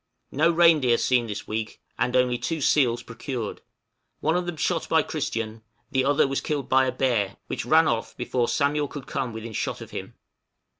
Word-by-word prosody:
No 155 +5 +3
reindeer 160 -8 +5
seen 125 -2 +2
this 105 -1 -6
week, 110 0 -4 0.2
and 125 +1 0
only 125 -1 +2
two 165 -1 -2
seals 125 -4 +2
procured; 115 -1 -5 0.6
one 160 - +1
of 180 0 -1
them 175 -2 -4
shot 165 +1 -1
by 160 -1 +4
Christian, 115 -7 -3 0.3
the 130 -1 +1
other 140 0 +3
was 135 0 -1
killed 145 -4 -2
by 130 0 +4
a - - +1
bear, 115 -8 0
which - - -4
ran 160 +4 +5
off 115 -1 -2
before 120 0 0
Samuel 145 0 +1
could 140 -1 -8
come 125 - -3
within 110 0 -7
shot - - -2
of - - -10
him. - - -7
130 Hz, 190 wpm, -25 LUFS, 115-150 Hz, 0.6 s, reindeer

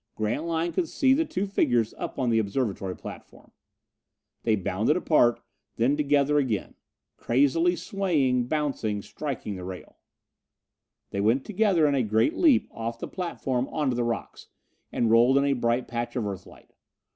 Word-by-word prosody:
Grantline 160 +10 -1
could 340 -4 -1
see 265 -1 +3
the 320 +4 +2
two 190 -7 -2
figures 120 - +1
up - - -6
on 125 -3 0
the 115 - +3
observatory 100 -4 -2
platform. - - -11 0.9
They 110 - +2
bounded 105 - 0
apart, 135 -9 +3 0.3
then 125 +5 +2
together 145 0 +2
again. 115 -8 -2 0.4
Crazily 145 +8 +2
swaying 145 -12 0
bouncing 130 -9 -2
striking 130 -9 -5
the 90 - -8
rail. 90 0 -9 1.1
They 100 - -2
went 115 +6 +2
together 200 -6 +2
in 145 - +1
a 135 - +2
great 110 0 +1
leap 300 -9 +4
off 115 0 -5
the - - -6
platform 135 -8 -3
onto 145 -5 -1
the 120 - 0
rocks, 120 -1 -4 0.4
and 115 -2 +1
rolled 120 +4 +5
in 140 - +3
a 140 - +2
bright 120 0 0
patch 120 +1 -4
of 120 -4 -1
Earthlight. 100 -2 -9
130 Hz, 155 wpm, -26 LUFS, 115-155 Hz, 1.1 s, rolled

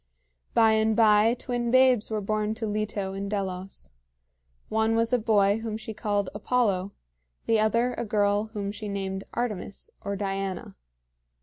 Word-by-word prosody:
By 225 -1 +6
and 220 0 +2
by 220 +1 +5
twin 240 -1 -2
babes 255 -3 +4
were 215 -1 -2
born 215 +1 -1
to 225 0 -3
Leto 210 -2 -2
in 195 +1 -4
Delos. 190 - -4 0.8
One 220 +1 +1
was 230 +1 +1
a 250 - +4
boy 210 -2 +3
whom 225 -1 -4
she 220 0 -7
called 205 -2 -1
Apollo, 205 -4 0 0.5
the 225 -1 +3
other 230 +3 +2
a - - -3
girl 205 -1 +1
whom 205 -2 -4
she 210 +1 -7
named 195 -1 -3
Artemis, 210 -5 -4
or 200 -1 -2
Diana. 195 - -3
215 Hz, 150 wpm, -27 LUFS, 200-225 Hz, 0.8 s, By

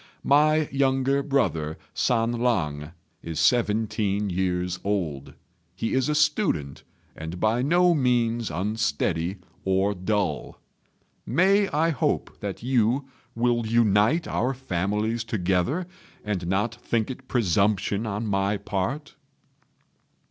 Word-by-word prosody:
My 155 +2 +4
younger 135 0 +2
brother, 80 - 0 0.2
San 115 -1 +1
lang, 85 -11 -1 0.3
is 80 -2 -5
seventeen 105 -4 +1
years 90 -1 -1
old. 85 -9 -2 0.4
He 115 - -2
is 130 +2 +1
a 150 - +1
student, 150 - +1 0.3
and 80 +3 -6
by 110 +4 +2
no 175 +5 +4
means 120 -5 +1
unsteady 90 -3 -1 0.3
or 95 +2 +1
dull. 95 -4 -2 0.6
May 195 - +3
I 160 +3 +1
hope 140 - -1
that 100 +1 -5
you 130 +2 +1 0.3
will 120 -1 +1
unite 115 - +3
our 130 +3 -1
families 105 0 -1
together, 105 - 0 0.4
and 95 -5 -2
not 105 +5 0
think 115 0 -2
it 130 0 -10
presumption 105 -1 +1
on 105 +2 -3
my 100 0 0
part?" 105 +10 -3
110 Hz, 110 wpm, -25 LUFS, 95-130 Hz, 0.6 s, My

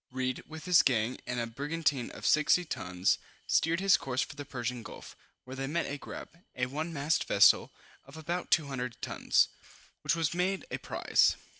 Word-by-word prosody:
Read, 130 -1 -2
with 160 0 -9
this 180 -2 +6
gang, 120 -1 +1
and 125 - -2
a 120 - 0
brigantine 145 +1 -1
of - - -9
60 155 +4 +4
tons, 90 - 0 0.3
steered 165 +1 +2
his 195 0 +5
course 130 -1 -1
for - - -9
the 145 - -6
Persian 125 -3 -4
Gulf, - - -11 0.3
where 130 +1 -9
they 135 0 -3
met 170 +4 -1
a 140 +1 -5
grab, 165 - -9 0.2
(a 125 - 0
one 155 +6 -4
masted 150 0 0
vessel) - - +5 0.3
of 135 +3 -13
about 170 +3 -3
200 130 -6 0
tons, - - +2 0.5
which - - +1
was 165 -2 0
made 185 +2 -1
a - - -3
prize. - - +2
140 Hz, 180 wpm, -30 LUFS, 125-165 Hz, 0.5 s, this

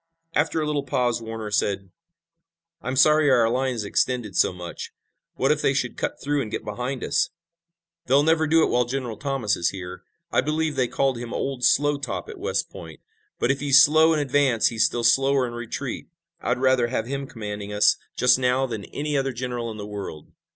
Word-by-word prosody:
After 160 +2 +1
a 155 - -1
little 150 -1 0
pause 125 -3 -1
Warner 110 -1 -6
said: 100 -2 -1 0.9
"I'm 130 - -3
sorry 150 +2 +5
our 120 -4 +4
line 130 +1 0
is 110 - -3
extended 110 -1 -1
so - - +3
much. 90 -1 -8 0.4
What - - +2
if - - +1
they - - +2
should - - -1
cut - - -3
through 145 0 -1
and 110 - -4
get - - -5
behind 125 +5 -4
us?" - - +1 0.8
"They'll 135 +3 +4
never 160 0 +2
do 160 +1 +4
it - - +1
while 125 0 +2
General 125 -2 -4
Thomas 135 -4 -1
is 85 - 0
here. 90 -1 -8 0.3
I - - +3
believe 155 0 -1
they 130 -2 +1
called 135 -1 0
him 120 -1 -6
'Old 135 -2 -3
Slow 145 +3 +3
Top' 145 - -5
at 430 -4 -9
West 465 +6 -2
Point, - - -10 0.4
but - - +1
if 135 - -2
he's 140 -1 +5
slow 155 +3 +6
in 160 - +2
advance 140 -5 +2
he's 115 -2 +2
still 120 - -1
slower 135 +1 +3
in 120 - -6
retreat. 120 +2 -5 0.3
I'd 125 - 0
rather 130 -2 +3
have 115 -2 -2
him 140 +2 -4
commanding 105 -4 -6
us 105 0 +3 0.2
just 125 +1 +4
now 125 +1 +2
than 110 -5 -5
any 150 0 -4
other 135 -1 0
general 120 -1 -4
in 110 - -7
the 105 - -6
world." 100 -7 -8
125 Hz, 205 wpm, -24 LUFS, 115-140 Hz, 0.9 s, slow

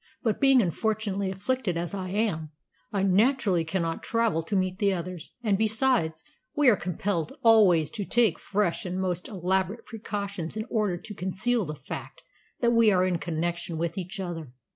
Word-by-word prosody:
But 220 -4 0
being 270 -3 +6
unfortunately 200 +1 -1
afflicted 200 0 -1
as 170 +3 -3
I 185 -2 -4
am, 190 -6 -1 0.4
I 200 -2 0
naturally 195 -2 +3
cannot 165 0 -2
travel 230 -8 +1
to 165 +5 -3
meet 185 0 0
the 200 -2 +3
others, 180 -2 -5
and, 205 -3 +2
besides, 220 -7 +1 0.3
we 295 -4 +5
are 225 - +5
compelled 180 -2 -2
always 200 -9 +5
to 220 -3 -3
take 220 -5 +2
fresh 200 -4 0
and 185 0 -3
most 180 -2 -2
elaborate 190 +3 -1
precautions 200 -5 -5
in 220 - -2
order 210 -6 +1
to 210 - -9
conceal 200 +5 -1
the 150 - -5
fact 140 -1 -8 0.4
that 235 -1 +3
we 230 -2 +5
are 185 -1 +3
in 180 -2 0
connection 170 0 -3
with 165 +1 -2
each 190 +2 -5
other. 165 -8 -5
190 Hz, 170 wpm, -27 LUFS, 175-220 Hz, 0.4 s, being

